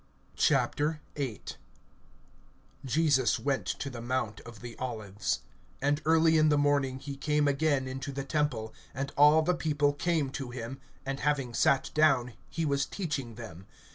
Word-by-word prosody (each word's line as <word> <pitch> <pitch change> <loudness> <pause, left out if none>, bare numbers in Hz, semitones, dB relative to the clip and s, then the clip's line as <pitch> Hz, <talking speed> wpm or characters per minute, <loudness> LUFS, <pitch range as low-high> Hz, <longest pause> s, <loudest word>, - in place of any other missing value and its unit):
VIII. 150 +2 +2 1.9
JESUS 135 -3 +3
went 140 -1 -1
to - - -3
the 120 -4 -6
mount 120 -4 -2
of 115 -2 -12
the 120 -1 -8
Olives. 110 -5 -3 0.4
(2)And 145 +1 +2
early 160 0 +5
in 155 0 +5
the 150 - +4
morning 140 -2 +2
he 140 +1 -7
came 150 +1 +1
again 140 -1 +1
into 135 +1 -5
the 135 0 -4
temple, 135 -7 -1 0.2
and 135 +2 -3
all 150 +2 +6
the 180 +3 +2
people 145 -4 +1
came 150 -2 0
to 135 -2 -5
him; 120 +1 -6 0.3
and 135 +1 -3
having 140 -5 0
sat 135 +3 +2
down, 135 -6 +3 0.2
he 165 - -2
was 140 -2 +1
teaching 145 - -4
them. 100 -6 -10
140 Hz, 150 wpm, -30 LUFS, 125-150 Hz, 1.9 s, all